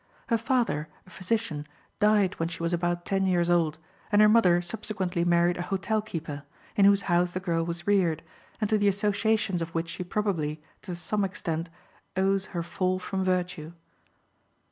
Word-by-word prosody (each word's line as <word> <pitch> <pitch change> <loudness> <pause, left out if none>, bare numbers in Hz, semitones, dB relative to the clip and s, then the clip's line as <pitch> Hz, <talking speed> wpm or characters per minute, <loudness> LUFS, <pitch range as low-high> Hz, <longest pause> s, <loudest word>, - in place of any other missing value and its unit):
Her 230 - +3
father, 230 - 0 0.2
a 185 - -17
physician, 185 -5 -2 0.3
died 210 -3 +3
when 165 0 0
she 170 - -5
was 170 +1 0
about 175 0 -1
ten 195 -1 +1
years 175 -1 +2
old, 160 -3 +2 0.3
and 205 - +4
her 215 - +8
mother 195 -6 +5
subsequently 180 -1 -2
married 175 0 +3
a - - -3
hotel 215 +3 0
keeper, 165 -8 -6 0.3
in 200 - +5
whose 200 0 +5
house 175 -1 +1
the 185 - -2
girl 170 -3 0
was 170 +1 -4
reared, 175 -6 +2 0.4
and 215 - +1
to 215 - +4
the 205 - +3
associations 200 -1 +1
of 165 0 -5
which 165 0 -1
she 175 +2 -5
probably, 175 -6 -1 0.2
to 180 -2 -6
some 205 +4 -1
extent, 165 -3 -3 0.5
owes 195 0 +2
her 170 -3 -3
fall 185 +2 -1
from 190 +1 -3
virtue. 180 -3 -1
180 Hz, 175 wpm, -27 LUFS, 170-200 Hz, 0.5 s, her